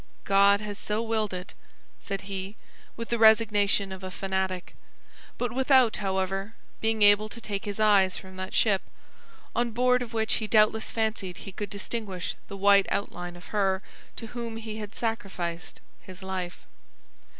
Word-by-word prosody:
"God 200 +1 +5
has 210 -1 -6
so 210 +2 -1
willed 220 -2 0
it!" 180 -1 -6 0.5
said 195 -2 -4
he, 195 +1 -5 0.4
with 230 0 -5
the 235 - 0
resignation 210 -3 +4
of 190 0 -8
a 185 - -4
fanatic; 190 -1 -2 0.6
but 245 -1 -1
without, 260 -2 +4
however, 195 +1 -2 0.2
being 220 -1 +1
able 205 +1 +6
to 235 - -9
take 205 -3 -4
his 205 0 -4
eyes 200 -3 +4
from 190 0 -10
that 185 0 -5
ship, 200 -4 +3 0.7
on 240 0 +1
board 250 +2 +3
of 240 - -5
which 220 -1 +1
he 215 - -2
doubtless 215 0 +3
fancied 220 -5 -2
he 195 - -9
could 205 +1 -5
distinguish 200 -2 -4
the 200 - -7
white 200 0 +5
outline 175 -3 -3
of 175 - -13
her 195 -1 +1 0.3
to 230 - -7
whom 235 -2 -4
he 220 -1 -6
had 210 0 -7
sacrificed 185 -7 -4 0.2
his 185 0 -12
life. 185 -2 -5
205 Hz, 160 wpm, -27 LUFS, 190-220 Hz, 0.7 s, able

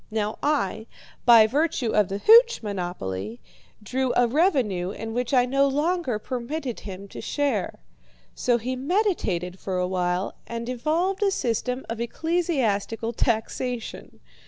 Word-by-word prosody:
Now 215 -1 -2
I, 225 -7 0 0.4
by 230 -3 +8
virtue 270 -1 0
of 210 -3 +3
the 195 - -3
hooch 465 - +6
monopoly, 120 - -4 0.4
drew 255 +4 -1
a 245 - +4
revenue 240 - +1
in 225 +3 -6
which 245 +2 -2
I 250 -2 +4
no 275 +2 +2
longer 295 -2 0
permitted 255 +3 -4
him 195 0 -8
to - - -8
share. 290 -1 -1 0.6
So 245 -1 +1
he 250 +3 -3
meditated 255 - -1
for 190 -2 -3
a 180 0 0
while 180 0 -1
and 235 0 -5
evolved 320 - 0
a 405 - +4
system 250 - -2
of 230 0 -4
ecclesiastical 235 - -1
taxation. 235 +1 -2
240 Hz, 135 wpm, -25 LUFS, 205-285 Hz, 0.6 s, by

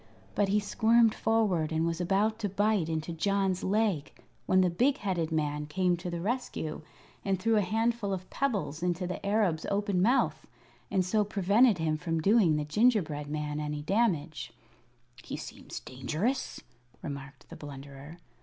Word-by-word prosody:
But 205 - +2
he 210 +2 +3
squirmed 225 +2 +3
forward 200 -8 +1
and 160 +1 +1
was 165 +1 -1
about 205 +5 +1
to 205 -3 -1
bite 205 -3 +1
into 160 +1 -2
John's 195 +2 0
leg 195 -7 0 0.4
when 185 0 +4
the 180 - +3
big 260 - +2
headed 175 - -2
man 150 -1 -1
came 180 +3 +1
to 175 +1 -5
the 170 -1 -3
rescue 200 -8 -3 0.4
and 195 -2 0
threw 225 +3 +2
a - - +4
handful 225 +1 0
of 185 -1 -4
pebbles 180 - -1
into 180 +1 -1
the 180 - -5
Arab's 200 -6 +1
open 200 -2 0
mouth, 245 +7 +2 0.4
and 185 -2 +1
so 210 +3 +2
prevented 205 +3 +3
him 160 -2 0
from 165 0 -2
doing 195 -3 +4
the 150 -1 -1
gingerbread 160 -5 +2
man 150 0 -3
any 150 -1 -3
damage. 170 -6 0 0.7
"He - - -5
seems - - -8
dangerous," 155 - -3 0.4
remarked 140 -3 -8
the - - -7
Blunderer. 140 +2 -10
180 Hz, 160 wpm, -29 LUFS, 155-210 Hz, 0.7 s, when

